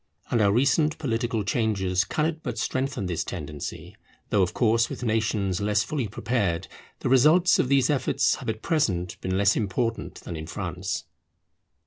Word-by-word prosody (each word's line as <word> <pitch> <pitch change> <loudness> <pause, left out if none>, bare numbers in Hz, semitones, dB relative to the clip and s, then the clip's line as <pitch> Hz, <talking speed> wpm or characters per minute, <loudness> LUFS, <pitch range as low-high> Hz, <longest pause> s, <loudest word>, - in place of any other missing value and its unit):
And 115 - +3
our 100 -1 +4
recent 145 +7 +2
political 115 -5 -1
changes 100 -3 0
cannot 155 +1 -1
but 120 -5 -4
strengthen 130 -2 -2
this 85 -3 -1
tendency; 75 -5 -6 0.4
though 100 - +3
of 90 - +2
course 115 -1 +3
with - - -6
nations 105 -4 0
less 105 +1 +2
fully 140 -7 -2
prepared 110 -5 -1 0.3
the - - -1
results 155 +8 +5
of 125 - +1
these 135 -2 +4
efforts 140 - +2
have - - -6
at 110 0 -4
present 95 - 0
been 95 0 -1
less 100 +1 +4
important 115 +2 -2
than 85 - -6
in 80 0 -6
France. - - -4
110 Hz, 160 wpm, -26 LUFS, 95-130 Hz, 0.4 s, results